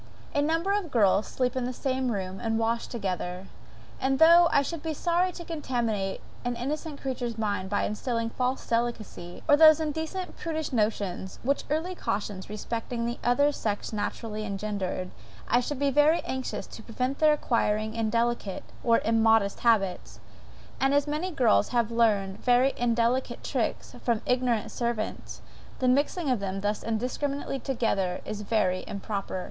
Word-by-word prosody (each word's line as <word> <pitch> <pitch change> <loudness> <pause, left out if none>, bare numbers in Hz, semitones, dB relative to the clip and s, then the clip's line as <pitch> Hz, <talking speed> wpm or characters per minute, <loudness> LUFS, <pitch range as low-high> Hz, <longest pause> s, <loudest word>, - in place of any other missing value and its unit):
A 285 - +2
number 330 +6 +1
of 405 -5 -1
girls 210 -4 +3
sleep 250 -1 -1
in 255 -1 -1
the 250 - -2
same 260 -1 -1
room, 190 -2 -4
and 225 -1 -1
wash 230 +1 0
together. 185 -4 -3 0.5
And, 270 +1 +1
though 335 +2 +8
I 285 - +4
should 330 +2 -5
be 320 -1 -3
sorry 350 +4 +1
to 345 - -8
contaminate 235 - -2 0.2
an 245 0 -1
innocent 290 +4 -4
creature's 245 -4 -3
mind 205 -3 -1
by 205 - 0
instilling 230 +1 -2
false 255 +2 -1
delicacy, 230 -7 -3
or 290 - +7
those 310 0 +8
indecent 320 +4 -3
prudish 315 -4 -3
notions, 205 -4 -1
which 280 +3 0
early 320 +5 -1
cautions 200 - -3
respecting 230 +2 -3
the 235 +1 -3
other 285 +4 +3
sex 210 -5 -3
naturally 215 +1 -3
engender, 200 -3 -3 0.4
I 240 - +4
should 270 +3 -3
be 280 +1 +1
very 295 +4 +4
anxious 260 -1 -4
to - - -11
prevent 250 +5 -3
their 310 -1 +6
acquiring 220 -6 0
indelicate, 230 -2 -1 0.2
or 230 -1 +4
immodest 225 -2 +3
habits; 210 -6 +1 0.6
and 270 +1 +3
as 285 0 +3
many 305 +5 -2
girls 245 - +3
have 235 -2 +1
learned 210 -4 +1
very 250 +2 +4
indelicate 240 +2 0
tricks, - - -2
from 235 -3 +1
ignorant 250 -4 +1
servants, 235 -3 -3 0.3
the 255 - 0
mixing 280 +2 +2
them 195 0 -3
thus 205 +1 -1
indiscriminately 270 +5 -2
together, 220 -8 -1
is 210 -1 -4
very 195 -4 +1
improper. 200 -1 -4
235 Hz, 155 wpm, -28 LUFS, 210-280 Hz, 0.6 s, though